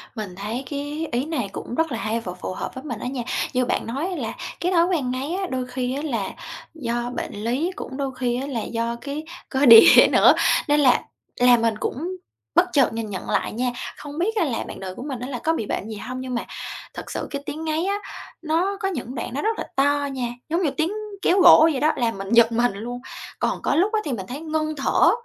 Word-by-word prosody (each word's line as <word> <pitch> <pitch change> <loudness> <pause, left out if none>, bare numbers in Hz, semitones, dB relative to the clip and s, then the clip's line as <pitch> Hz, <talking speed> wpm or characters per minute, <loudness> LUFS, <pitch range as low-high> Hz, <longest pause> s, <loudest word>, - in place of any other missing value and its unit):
Mình 210 -5 -6
thấy 215 +7 -4
cái 290 +2 -3
ý 245 +3 0
này 265 -10 -2
cũng 240 - -6
rất 325 +1 +1
là 230 - -2
hay 225 +1 -1
và 180 -5 -6
phù 180 +1 -6
hợp - - -5
với 260 - -7
mình 245 -7 -5
á - - -4
nha, 250 -1 -3 0.3
như 255 -1 +2
bạn - - -1
nói 275 +9 -2
á, 375 - -3
là 230 -8 -3 0.3
cái 355 +2 0
thói 340 -2 +4
quen 315 -9 0
ngáy 265 +6 -3
á, 380 +1 -2
đôi 255 -1 -1
khi 250 0 -2
á, 285 - -3
là 230 -9 -2 0.4
do 240 -5 -2
bệnh - - -4
lý, 240 - -1
cũng 265 - -7
đôi 275 -2 -2
khi 245 -1 -1
á, 275 - -4
là 250 -5 -2
do 230 0 -2
cái 285 +2 -5 0.3
cơ 270 +1 +2
địa 230 -3 +10
nữa, - - +7 0.3
nên 295 0 +4
là 255 -4 +5 0.4
làm 245 -1 +6
mình 230 -1 +2
cũng 345 +8 -3 0.4
bất 350 - +6
chợt 270 -6 +4
nhìn 225 -1 -4
nhận 190 -2 -6
lại - - 0
nha, 245 +2 0 0.3
không 290 +1 -8
biết 430 +6 0
á 410 - +2
là 245 -6 -2
bạn - - -8
đời 185 -1 -6
của - - -7
mình 270 -4 -5
á, 250 - -5
là 255 -3 -4
có 320 +7 +1
bị 225 - -2
bệnh 205 - -3
gì 220 - -5
hông? 255 +5 -6
Nhưng 255 -1 -4
mà 235 - -2 0.5
thật - - -8
sự - - -4
cái 280 -1 -3
tiếng 310 +2 -5
ngáy 315 +2 0
á, 400 +1 +1 0.5
nó 345 +5 0
có 390 - -1
những 260 -8 -4
đoạn 235 - -4
nó 280 - -2
rất 445 +1 0
là - - -3
to 285 +1 +2
nha, 255 -3 -2 0.2
giống 335 +3 +1
như 300 - +1
tiếng 325 +3 +1 0.3
kéo 375 - +3
gỗ 330 -2 +9
vậy 275 - -1
đó, 305 +3 +3
làm 230 -4 0
mình 195 0 -6
giật 235 0 +6
mình 240 0 +2
luôn, 235 +5 -6 0.4
còn - - 0
có - - +1
lúc 385 +8 +2
á, 435 - +3
thì 290 - -2
mình 195 -5 -4
thấy 265 +3 -5
ngưng 310 -1 -2
thở, 275 - +4
265 Hz, 255 wpm, -23 LUFS, 235-310 Hz, 0.5 s, địa